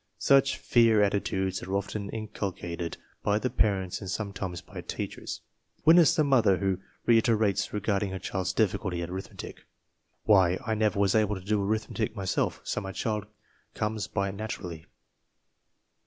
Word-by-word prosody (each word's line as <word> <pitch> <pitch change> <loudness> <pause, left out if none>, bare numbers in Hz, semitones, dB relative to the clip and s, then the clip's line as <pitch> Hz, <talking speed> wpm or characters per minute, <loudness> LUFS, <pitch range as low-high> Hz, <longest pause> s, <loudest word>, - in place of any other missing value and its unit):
Such 135 0 +4
fear 115 -3 +4
attitudes 95 -2 0
are 95 +2 -3
often 100 +1 -3
inculcated 95 -6 -4 0.2
by 105 0 +2
the 125 +4 -1
parents 95 -3 0
and 95 - -6
some 100 +1 -3
times 95 -3 -4
by - - -9
teachers. - - -5 0.4
(Witness 165 0 +7
the 155 - +3
mother 120 -9 +4
who 95 0 0 0.3
reiterates 110 -3 +3
regarding 100 -1 0
her 95 - -4
child's 95 -1 -2
difficulty 95 -4 0
with 85 +1 -5
arithmetic, 95 +1 -8 0.6
"Why, 95 -4 +5
I 110 - 0
never 105 -1 +1
was 100 -2 +3
able 105 -1 +2
to 95 -1 -9
do 105 0 +1
arithmetic 110 +2 -1
myself, 95 -3 -1
so - - -2
my 95 -1 -6
child 105 0 -2 0.5
comes 105 0 -2
by 100 -1 -1
it - - -5
naturally.") 95 -6 -6
100 Hz, 155 wpm, -28 LUFS, 95-110 Hz, 0.6 s, Witness